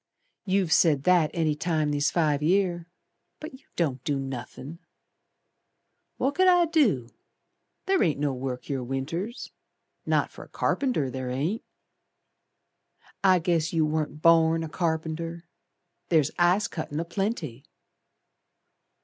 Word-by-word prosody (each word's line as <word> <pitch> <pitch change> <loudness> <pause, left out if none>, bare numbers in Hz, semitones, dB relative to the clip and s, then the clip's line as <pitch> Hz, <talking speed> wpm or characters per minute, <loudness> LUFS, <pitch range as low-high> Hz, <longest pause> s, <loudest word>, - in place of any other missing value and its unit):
"You've 190 -4 +1
said 150 -5 +4
that 175 -3 +4
any 160 -3 0
time 155 -1 -1
these 145 +1 +1
five 150 -4 +1
year, 175 0 +1 0.5
But 310 - -8
you 260 +1 -16
don't 135 -7 -1
do 145 -2 -1
nothin'." 135 +3 -7 1.4
"Wot 275 - 0
could 370 +3 +3
I 355 -1 +5
do? 245 - +2 0.8
Ther 385 0 +2
ain't 155 -7 +1
no 145 -2 0
work 125 -1 -4
here 135 -3 -3
Winters. 150 - -4 0.6
Not - - +1
fer - - -11
a - - -23
carpenter, 245 - 0
ther 130 -1 -4
ain't." 155 - -2 1.6
"I 185 -1 +6
guess 165 -1 0
you 160 -2 +2
warn't 155 -1 -3
born 165 0 +5
a 160 - -5
carpenter. 165 0 -3 0.7
Ther's 155 -4 +3
ice 180 +4 +3
cuttin' 155 -4 -5
a 165 - -2
plenty." 170 - -3
160 Hz, 130 wpm, -26 LUFS, 145-180 Hz, 1.6 s, I